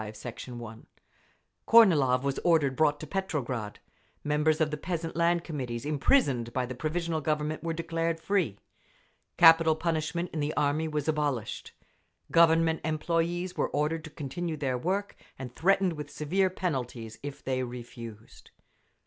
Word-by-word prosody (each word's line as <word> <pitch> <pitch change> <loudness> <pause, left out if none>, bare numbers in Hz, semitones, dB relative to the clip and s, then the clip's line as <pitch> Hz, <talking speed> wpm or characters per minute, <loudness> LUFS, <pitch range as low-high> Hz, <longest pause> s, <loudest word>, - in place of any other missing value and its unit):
V, 105 0 -7
Sect. 115 +4 -8
1)… 120 -3 -9 0.8
Kornilov 150 - +6
was 140 -1 -1
ordered 155 -6 +2
brought 145 -1 +2
to - - -6
Petrograd. 140 - -3 0.5
Members 150 +1 +2
of 155 -1 +1
the 150 - -2
Peasant 165 0 -4
Land 170 0 +2
Committees 125 -7 -5
imprisoned 140 - +2
by 130 -1 0
the 125 - -6
Provisional 160 +4 -2
Government 150 +1 -1
were 165 - -1
declared 165 0 -2
free. 170 - 0 0.8
Capital 165 -1 +7
punishment 165 +2 -2
in 160 - -2
the 150 +1 -2
army 150 +2 +1
was 150 -1 -3
abolished. 145 -7 -2 0.6
Government 165 -1 +4
employees 170 +3 -1
were - - 0
ordered 155 +2 -1
to - - -8
continue 155 +2 -4
their 135 -3 -1
work, 190 +10 -2 0.2
and 125 -2 -7
threatened 190 0 +2
with 150 -2 -7
severe 185 +7 0
penalties 125 -11 -4
if 145 0 -7
they 130 -1 -1
refused. 120 -3 -9
155 Hz, 145 wpm, -29 LUFS, 130-165 Hz, 0.8 s, Capital